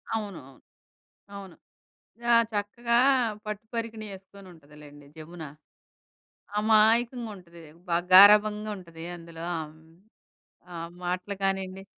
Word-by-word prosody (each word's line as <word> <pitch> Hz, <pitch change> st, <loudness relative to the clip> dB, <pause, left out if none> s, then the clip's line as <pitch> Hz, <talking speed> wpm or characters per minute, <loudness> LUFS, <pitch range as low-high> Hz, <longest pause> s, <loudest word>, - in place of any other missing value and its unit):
అవును. 205 Hz, -5 st, -5 dB, 0.9 s
అవును. 195 Hz, -3 st, -10 dB, 0.8 s
ఆ! -, -, +7 dB, 0.2 s
చక్కగా 235 Hz, +3 st, -1 dB, 0.5 s
పట్టు 210 Hz, 0 st, -6 dB
పరికినీ 225 Hz, -1 st, -4 dB
యేసుకొనుంటదిలేండి, 150 Hz, -7 st, -15 dB
జమున, 160 Hz, +2 st, -10 dB, 1.2 s
అమాయకంగుంటది. 220 Hz, -5 st, +1 dB, 0.3 s
బాగా 170 Hz, +1 st, +1 dB
గారాబంగుంటది 205 Hz, -4 st, +5 dB
అందులో 165 Hz, -1 st, -10 dB
ఆహ్, 155 Hz, -1 st, -8 dB
హ్మ్, 160 Hz, +1 st, -22 dB, 0.8 s
ఆ -, -, -7 dB, 0.3 s
మాటలు 180 Hz, +3 st, -3 dB
కానీయండి. 195 Hz, 0 st, -2 dB
195 Hz, 85 wpm, -27 LUFS, 170-215 Hz, 1.2 s, ఆ